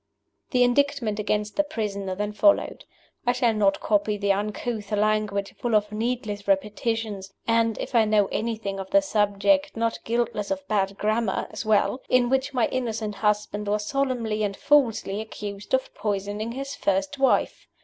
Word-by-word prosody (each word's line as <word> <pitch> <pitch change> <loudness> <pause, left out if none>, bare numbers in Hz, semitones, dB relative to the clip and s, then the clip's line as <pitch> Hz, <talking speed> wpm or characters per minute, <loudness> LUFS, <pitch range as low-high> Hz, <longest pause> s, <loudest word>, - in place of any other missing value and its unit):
The 250 -1 +3
Indictment 245 -4 +1
against 210 0 -1
the 300 - +4
prisoner 200 -9 -3
then 210 +2 -3
followed. 300 +9 +2 0.4
I 245 - +4
shall 240 -2 +2
not 200 -2 +2
copy 210 0 +1
the 200 0 +1
uncouth 210 +2 -3
language, 210 -1 0
full 235 -2 0
of 210 0 +2
needless 215 -2 -3
repetitions 210 0 -1 0.2
(and, 230 -1 +2
if - - -5
I 230 -2 +5
know 210 -1 +3
anything 215 -3 -2
of 190 0 -6
the 295 0 +4
subject, 200 -5 +1
not 230 0 0
guiltless 230 -3 -1
of 285 -1 -3
bad 200 -2 0
grammar 215 -1 0
as 215 +1 -5
well), 220 +4 +2
in 250 -1 +3
which 265 +1 +1
my 250 -4 +2
innocent 225 -4 -2
husband 210 0 -1
was 210 0 0
solemnly 245 -5 -1
and 200 -2 -1
falsely 230 -8 +2
accused 205 -2 -7
of 260 - -3
poisoning 205 +2 -3
his 275 +2 -5
first 290 -1 -1
wife. 270 - +1
215 Hz, 160 wpm, -25 LUFS, 205-240 Hz, 0.4 s, I